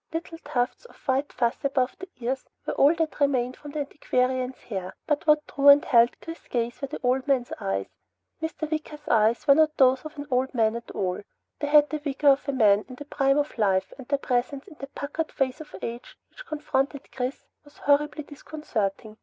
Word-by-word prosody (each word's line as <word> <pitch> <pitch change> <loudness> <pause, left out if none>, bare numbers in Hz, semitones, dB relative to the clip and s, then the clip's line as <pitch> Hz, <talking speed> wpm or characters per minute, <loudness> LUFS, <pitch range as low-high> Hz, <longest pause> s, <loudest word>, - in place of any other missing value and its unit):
Little 330 0 -5
tufts 245 - -2
of - - -16
white 270 +2 +1
fuzz 235 -1 -1
above 265 -2 0
the 375 - -8
ears 255 +2 -2 0.2
were - - -2
all 290 +4 +5
that 325 -2 -2
remained 255 -3 +1
of 290 -1 -8
the 305 - -1
antiquarian's 255 -2 -1
hair, 190 -4 -5
but 295 +1 -1
what 300 0 +4
drew 280 0 0
and 285 0 +9
held 235 0 +4
Chris's 330 0 -9
gaze 240 +1 -2
were 275 - -2
the 295 - -6
old 255 +2 +1
man's 260 -3 +1
eyes. 95 0 -2 0.6
Mr. 320 -1 -3
Wicker's 305 -1 -5
eyes 225 -1 +3
were 280 - +7
not 310 +1 +3
those 260 -1 +4
of 310 -1 -9
an 285 - -5
old 255 +1 0
man 225 -1 +2
at 235 - -7
all. 185 -2 -2 0.4
They 290 - -2
had 295 -1 +5
the 305 - -2
vigor 290 0 +2
of 275 +1 +3
a - - +3
man 215 -5 +4
in 255 - -8
the 290 - -9
prime 275 -1 +2
of 295 0 -1
life, 190 -3 +1
and 260 - -10
their 280 - +1
presence 270 +2 -2
in 320 -6 -14
that 275 +1 -9
puckered 300 +3 -3
face 270 +2 -1
of 300 - -11
age 235 +1 -6
which - - -13
confronted 285 -2 -2
Chris 255 +1 -4 0.2
was 290 0 -20
horribly 295 +1 +1
disconcerting. 220 -8 -4
275 Hz, 210 wpm, -26 LUFS, 245-295 Hz, 0.6 s, and